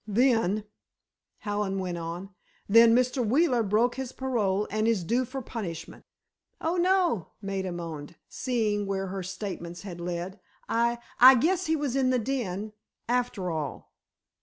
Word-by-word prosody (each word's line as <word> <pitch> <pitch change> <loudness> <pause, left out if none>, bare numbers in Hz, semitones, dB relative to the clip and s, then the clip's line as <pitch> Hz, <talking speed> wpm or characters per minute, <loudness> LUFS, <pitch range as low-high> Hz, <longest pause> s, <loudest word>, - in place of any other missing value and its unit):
"Then," 215 -2 +2 0.8
Hallen 205 -2 -1
went 180 -2 -3
on, 170 +4 -6 0.4
"then, 230 +2 +7
Mr. 255 +1 +2
Wheeler 250 +2 +3
broke 220 +4 +2
his 265 -2 -4
parole—and 215 -4 0
is 220 -6 +2
due 240 +8 +1
for 265 +2 -6
punishment." 180 -10 -6 0.5
"Oh, 330 +2 -1
no," 355 - +2
Maida 195 -2 -3
moaned, 165 -4 -6
seeing 215 -5 -1
where 195 -1 -2
her 195 0 -4
statements 185 -2 -6
had 175 -4 -7
led. 175 +3 -4 0.3
"I—I 235 +2 +5
guess 345 +8 +1
he 320 - +2
was 285 -4 -2
in 265 -1 +2
the 255 - +3
den—after 215 -2 -3
all." 155 -3 -5
215 Hz, 135 wpm, -28 LUFS, 190-250 Hz, 0.8 s, then